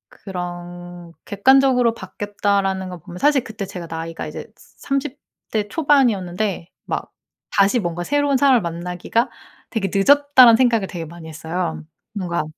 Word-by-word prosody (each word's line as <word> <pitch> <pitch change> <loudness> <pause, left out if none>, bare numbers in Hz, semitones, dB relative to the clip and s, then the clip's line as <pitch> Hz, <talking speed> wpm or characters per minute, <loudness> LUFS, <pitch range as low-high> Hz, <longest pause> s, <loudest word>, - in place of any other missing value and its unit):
그런 175 -2 -8
객관적으로 250 +2 +4
바뀌었다라는 200 -1 -2
거 180 -1 -8
보면 175 +3 -11
사실 290 -3 +3
그때 215 -2 -6
제가 180 -2 -8
나이가 165 0 -5
이제 - - -7
30 275 0 -4 0.3
대 210 -2 -1
초반이었는데 215 - +1 0.2
막 - - -4 0.4
다시 200 +4 +3
뭔가 175 -3 -3
'새로운 285 +4 +1
사람을 260 -3 +4
만나기가 180 +7 -2 0.4
되게 205 -4 -1
늦었다.'라는 260 +2 +6
생각을 235 -5 +3
되게 170 -3 -6
많이 165 0 -11
했어요. 160 +1 -4 0.3
뭔가 175 -5 -2
195 Hz, 325 characters per minute, -21 LUFS, 175-245 Hz, 0.4 s, 늦었다.'라는